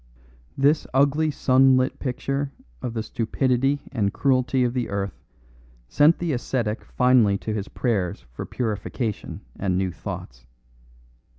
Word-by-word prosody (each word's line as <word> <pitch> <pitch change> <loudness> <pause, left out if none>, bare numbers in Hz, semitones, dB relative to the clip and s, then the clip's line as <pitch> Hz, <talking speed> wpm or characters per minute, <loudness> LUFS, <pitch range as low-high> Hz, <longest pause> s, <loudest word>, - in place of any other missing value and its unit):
This 145 +3 +3
ugly 145 +3 +3
sunlit 130 -2 +3
picture 135 +2 -2 0.3
of 120 -2 -4
the 110 - -1
stupidity 130 +5 0
and 105 -6 0
cruelty 130 -1 +2
of 120 -1 0
the 125 -2 -2
earth 100 -2 -3 0.7
sent 150 - +4
the 170 -3 -1
ascetic 120 -3 -2
finally 125 -6 +3
to 110 +2 -4
his 105 -2 -3
prayers 100 -8 -2
for - - -6
purification 110 -1 -3 0.2
and 95 -2 0
new 95 -1 0
thoughts. - - -8
125 Hz, 125 wpm, -24 LUFS, 105-135 Hz, 0.7 s, sent